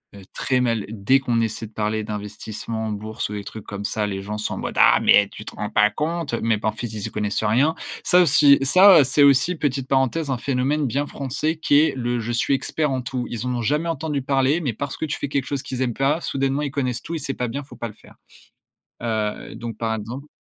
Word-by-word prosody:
heu, 100 - -11
très 130 -1 0
mal. 115 -4 0
Dès 110 +5 +2
qu'on 120 -3 0
essaie 110 0 -3
de 110 - -21
parler 110 0 -1
d'investissement 105 +2 -5
en - - -3
bourse 110 +1 -4
ou - - -6
des 105 -1 -5
trucs 110 +1 -9
comme 100 0 -6
ça, 105 0 -1
les 95 -1 -4
gens 105 +2 -5
sont 105 - -3
en - - -7
mode: - - -5
«Ah - - +6
mais 100 - +6
tu 105 - -10
te - - -8
rends 105 - -4
pas 105 0 +4
compte!» 160 +5 -3
Mais 115 -1 +2
par 105 0 -2
contre 115 0 -5
ils 105 -2 -5
y - - -9
connaissent 105 0 -2
rien. 130 +10 +2 0.3
Ça 180 - +5
aussi, 145 -3 +6
ça, 185 +8 +7
heu, - - +5
c'est 135 +3 +3
aussi, 140 +5 +4
petite 135 -4 -2
parenthèse, 135 +3 +1
un 130 - 0
phénomène 140 +4 0
bien 140 +4 -1
français 145 +5 -2
qui 145 -2 +4
est 155 - +3
le: 120 -1 -1
«Je 115 +1 -3
suis 120 +4 +1
expert 140 +2 -1
en 130 -1 -1
tout». 125 0 -4
Ils 120 +1 -4
en 125 - -1
ont 120 - -2
jamais 150 +8 0
entendu 155 -2 -2
parler, 135 +4 +1
mais 135 -8 -1
parce 140 +5 -5
que - - -2
tu 155 - -3
fais - - -3
quelque 140 -2 -1
chose 140 -1 -3
qu'ils 130 -2 -5
aiment 125 -2 0
pas, 140 +7 +1
soudainement 135 0 -1
ils 145 -2 -2
connaissent 125 -4 -2
tout 165 - -5
et - - -3
c'est 135 -1 -3
pas 125 - -3
bien, 140 +5 -4
faut 140 - -14
pas 120 - -4
le - - -12
faire. - - -19 0.9
Heu, 110 -3 -3
donc 115 -2 -7
par 115 -1 -1
exemple 115 +6 -6
125 Hz, 255 wpm, -22 LUFS, 110-140 Hz, 0.9 s, ça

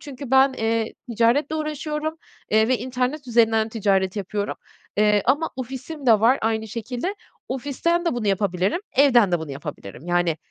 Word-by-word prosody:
Çünkü 275 -2 -9
ben, 265 0 +5
eee, 225 -2 -1 0.2
ticaretle 240 +7 +2
uğraşıyorum, 305 +1 -3 0.3
eee, 220 +2 +4
ve 255 - +2
internet 255 +4 -2
üzerinden 225 -1 +3
ticaret 195 -3 0
yapıyorum, 205 +1 -3 0.4
eee, 210 -1 +3
ama 290 +6 +1
ofisim 265 +3 -6
de 220 -3 +6
var 245 +4 +4
aynı 220 0 -1
şekilde. 245 - -4 0.3
Ofisten 290 +6 -1
de 335 - 0
bunu 225 -3 -3
yapabilirim, 195 - 0 0.2
evden 240 -9 +5
de 175 - +3
bunu 160 - -6
yapabilirim. 140 - -8
Yani, 175 -2 +1
235 Hz, 155 wpm, -23 LUFS, 210-270 Hz, 0.4 s, de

